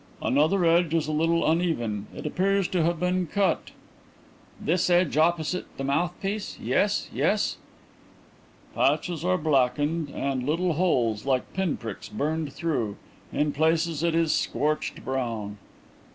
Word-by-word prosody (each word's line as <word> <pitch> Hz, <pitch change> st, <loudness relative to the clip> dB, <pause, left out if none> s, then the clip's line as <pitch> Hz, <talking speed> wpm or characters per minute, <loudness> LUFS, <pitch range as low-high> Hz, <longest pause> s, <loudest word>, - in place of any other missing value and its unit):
"Another 160 Hz, +7 st, +2 dB
edge 165 Hz, -1 st, +3 dB
is 160 Hz, -2 st, +1 dB
a -, -, -1 dB
little 165 Hz, +2 st, +2 dB
uneven; 135 Hz, -, 0 dB
it -, -, -7 dB
appears 195 Hz, +4 st, +1 dB
to 180 Hz, -, +1 dB
have 170 Hz, 0 st, +1 dB
been 180 Hz, 0 st, 0 dB
cut." 195 Hz, +4 st, 0 dB, 0.9 s
"This 180 Hz, +3 st, +1 dB
edge 175 Hz, -4 st, +3 dB
opposite 165 Hz, +2 st, +1 dB
the 135 Hz, -, -4 dB
mouthpiece. 180 Hz, +8 st, -2 dB
Yes, -, -, +1 dB
yes." -, -, +1 dB, 1.2 s
"Patches 170 Hz, -3 st, +1 dB
are 185 Hz, +1 st, +2 dB
blackened, 145 Hz, +1 st, +1 dB
and 135 Hz, -2 st, -2 dB
little 165 Hz, +5 st, 0 dB
holes 125 Hz, -, +1 dB
like 130 Hz, -2 st, 0 dB
pinpricks 145 Hz, -, -3 dB
burned 150 Hz, +5 st, -2 dB
through. 130 Hz, -11 st, -2 dB, 0.3 s
In 150 Hz, 0 st, +1 dB
places 160 Hz, +1 st, +1 dB
it 170 Hz, -1 st, +1 dB
is 165 Hz, -2 st, +2 dB
scorched 150 Hz, +1 st, -1 dB
brown." 115 Hz, -6 st, -3 dB
160 Hz, 130 wpm, -26 LUFS, 140-175 Hz, 1.2 s, edge